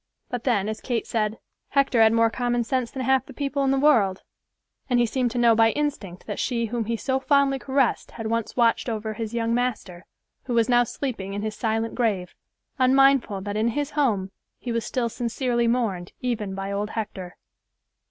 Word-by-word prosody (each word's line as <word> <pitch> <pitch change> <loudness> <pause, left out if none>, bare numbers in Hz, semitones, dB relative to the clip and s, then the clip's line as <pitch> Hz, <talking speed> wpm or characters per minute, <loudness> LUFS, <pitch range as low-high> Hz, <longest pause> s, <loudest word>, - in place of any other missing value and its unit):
But 245 -2 -4
then, 215 -6 +2
as 215 0 -4
Kate 240 -3 -2
said, 215 -1 -1 0.3
"Hector 275 -4 +3
had 220 0 +6
more 230 0 +3
common 240 0 0
sense 250 0 -1
than 265 - -5
half 265 0 +2
the 270 - -12
people 280 -1 -1
in 270 - +2
the 270 - +2
world," 220 -10 +3 0.7
and 245 -1 +3
he 240 - +4
seemed 245 +2 0
to 240 - -5
know 235 -1 +5
by 225 0 +5
instinct 250 -12 -3
that - - -5
she 235 -2 0
whom 230 0 -2
he 230 +1 -1
so 265 +3 -1
fondly 275 0 +2
caressed 265 -1 0
had 225 - -7
once 230 0 -2
watched 235 0 +2
over 220 -1 -3
his 225 +1 -5
young 230 0 0
master, 220 -8 -2 0.4
who 245 - -2
was 230 -1 +3
now 245 -1 +4
sleeping 230 -6 -4
in 205 - -3
his 215 0 -2
silent 225 +1 -1
grave, 205 -7 -1 0.5
unmindful 260 -5 +4
that 205 +1 -4
in 215 +2 +1
his 290 0 -1
home 215 -10 0 0.3
he 245 - -5
was 230 -1 -1
still 250 -3 -1
sincerely 240 +1 -1
mourned 215 -7 -1
even 220 -6 -2
by 195 0 -4
old 205 +1 -2
Hector. 195 -5 -6
235 Hz, 200 wpm, -24 LUFS, 215-255 Hz, 0.7 s, had